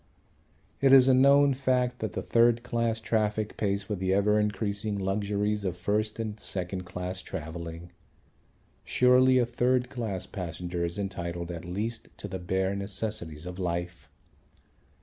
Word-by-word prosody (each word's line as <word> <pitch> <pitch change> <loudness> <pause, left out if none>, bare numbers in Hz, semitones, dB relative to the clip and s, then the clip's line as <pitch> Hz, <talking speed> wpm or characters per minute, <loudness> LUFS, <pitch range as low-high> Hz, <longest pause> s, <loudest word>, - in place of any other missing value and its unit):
It 135 -1 +5
is 130 -1 +8
a 130 - +6
known 140 +2 +6
fact 125 -2 0
that 110 -5 -3
the - - -3
third 120 0 +3
class 115 -2 -1
traffic 110 -1 -1
pays 100 -1 -1
for 105 - -4
the 95 -1 0
ever 105 +1 +3
increasing 105 0 -1
luxuries 100 +2 -1
of 90 -2 -2
first 105 +4 -1
and 110 -2 -4
second 90 -1 -3
class 90 +1 -5
travelling. 85 0 -7 0.9
Surely 130 +1 +4
a 125 - +4
third 125 +1 +1
class 110 -7 -4
passenger 90 -1 -4
is 85 +2 -2
entitled 85 -3 -4
at 85 0 -7
least 105 +6 -4
to - - -6
the 95 -1 -5
bare 95 +2 -1
necessities 100 -5 -2
of 90 +1 -7
life. 85 -1 -3
100 Hz, 150 wpm, -28 LUFS, 90-115 Hz, 0.9 s, is